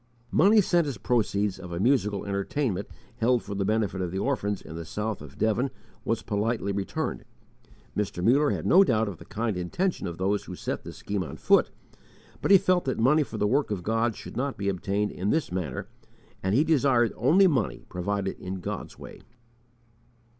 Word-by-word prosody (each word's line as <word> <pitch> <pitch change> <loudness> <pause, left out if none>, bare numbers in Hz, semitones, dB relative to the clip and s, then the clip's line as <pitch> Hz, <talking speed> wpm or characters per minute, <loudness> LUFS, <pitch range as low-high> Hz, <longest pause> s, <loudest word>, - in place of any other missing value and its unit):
Money 210 +3 +5
sent 175 -4 +2
as 140 - -4
proceeds 105 -5 0
of 90 -1 -9
a 85 - -3
musical 105 -3 +1
entertainment 100 +1 -1 0.3
held 125 0 +2
for 100 - -6
the 100 0 -1
benefit 105 -2 0
of 90 - -1
the 95 - -4
orphans 105 -4 -1
in 80 - -10
the 85 - -5
south 105 +4 -4
of 75 -3 -11
Devon 110 +5 +1 0.3
was - - -1
politely 105 0 -1
returned, 100 0 -3 0.7
Mr. 100 -4 -2
Muller 140 +7 +4
had - - -2
no 190 +3 +7
doubt 110 - +1
of 95 -5 -6
the - - -12
kind 110 -1 -2
intention 130 - -1
of 85 -1 -6
those 100 +2 0
who 90 - -7
set - - -4
this - - -9
scheme 100 -2 -2
on - - -8
foot, - - +4 0.7
but - - -1
he 195 - +9
felt 185 -1 +2
that 130 - -1
money 135 +7 +4
for 125 -6 -4
the 105 - +1
work 135 +7 +2
of 100 -4 -3
God 115 +2 +1
should - - -10
not 135 +2 -2
be 100 0 -1
obtained 100 +2 -1
in 95 +3 -2
this 155 - 0
manner, 90 -8 -3 0.5
and 95 +2 0
he 140 - +5
desired 135 -7 +3
only 160 - +5
money 135 - 0
provided 95 +2 -3
in 95 +1 -5
God's 90 - -6
way. - - -11
105 Hz, 195 wpm, -27 LUFS, 95-130 Hz, 0.7 s, he